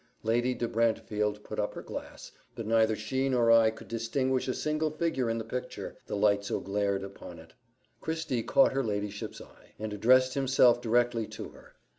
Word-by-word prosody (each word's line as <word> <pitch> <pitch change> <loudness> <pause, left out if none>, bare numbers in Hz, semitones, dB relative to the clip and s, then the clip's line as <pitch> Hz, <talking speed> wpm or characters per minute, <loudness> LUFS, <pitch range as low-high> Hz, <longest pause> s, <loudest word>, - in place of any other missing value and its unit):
Lady 120 +3 +1
de 120 - -2
Brantefield 105 -2 0
put - - -6
up - - -2
her - - -7
glass, - - -8 0.2
but 115 - -5
neither 110 0 +3
she 130 +6 -1
nor 120 -3 +3
I 115 -1 +6
could 110 - -10
distinguish 130 +3 -1
a 130 - 0
single 155 +1 0
figure 155 -6 -1
in 115 - 0
the 115 - -3
picture, 125 +3 -6
the - - -3
light 100 0 +3
so 100 - -2
glared 100 -1 -1
upon 100 -3 -9
it. 80 0 -15 0.5
Christie 160 -6 -2
caught 270 - +4
her 135 0 0
ladyship's 105 -2 -4
eye, - - -17
and 110 0 -5
addressed 130 +5 +4
himself 130 -3 +4
directly 120 -1 +1
to - - -8
her. - - -18
115 Hz, 185 wpm, -29 LUFS, 105-130 Hz, 0.5 s, I